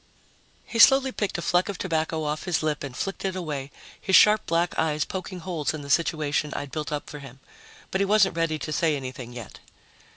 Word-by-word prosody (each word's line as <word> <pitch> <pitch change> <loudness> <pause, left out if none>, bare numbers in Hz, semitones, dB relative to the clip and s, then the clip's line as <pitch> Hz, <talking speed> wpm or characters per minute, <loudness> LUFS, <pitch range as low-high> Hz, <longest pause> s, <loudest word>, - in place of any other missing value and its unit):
He 230 - -4
slowly 270 +2 +7
picked 205 -7 -2
a 170 - -4
fleck 180 +4 +2
of 200 - -4
tobacco 160 -2 -1
off 150 +2 -3
his 180 -3 0
lip 150 -2 -1
and 135 -3 -7
flicked 195 - -4
it 190 -1 -2
away, 150 -6 -4 0.3
his 190 - +2
sharp 215 0 +6
black 170 +1 +1
eyes 155 -2 +1
poking 185 -1 -6
holes 165 -4 -2
in 150 - -7
the 140 - -5
situation 150 -2 +1
I'd 145 -1 -5
built 155 -1 -4
up 150 -1 -3
for 150 - -8
him. 135 -2 -12 0.5
But 190 - 0
he - - +3
wasn't 195 -3 +3
ready 165 -2 0
to 155 0 -5
say 155 0 +2
anything 130 -2 -7
yet. 120 -4 -9
160 Hz, 215 wpm, -25 LUFS, 145-185 Hz, 0.5 s, slowly